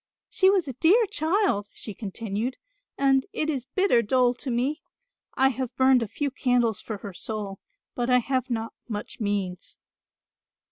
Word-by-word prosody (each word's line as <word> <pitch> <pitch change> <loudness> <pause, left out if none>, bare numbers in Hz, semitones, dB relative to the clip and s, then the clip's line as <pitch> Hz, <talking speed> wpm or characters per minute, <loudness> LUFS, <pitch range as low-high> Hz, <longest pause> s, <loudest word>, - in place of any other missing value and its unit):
She 380 - +4
was 380 -5 +2
a 265 - -4
dear 380 - +4
child," 325 - +1
she 215 - -5
continued, 220 +4 -4 0.4
"and 270 -1 +3
it 310 0 0
is 265 -4 -3
bitter 315 -3 +3
dole 245 +2 +3
to 255 +2 -6
me. 255 +6 0 0.5
I 265 +1 +4
have 260 -1 -4
burned 260 -1 +5
a 230 - -1
few 285 +7 -2
candles 245 -4 +1
for 215 - -5
her 200 -1 -8
soul, 205 0 -5 0.3
but 245 0 -2
I 250 - +6
have 255 +1 0
not 230 -1 -3 0.2
much 210 -2 -5
means." 200 -4 -3
250 Hz, 160 wpm, -26 LUFS, 220-275 Hz, 0.5 s, I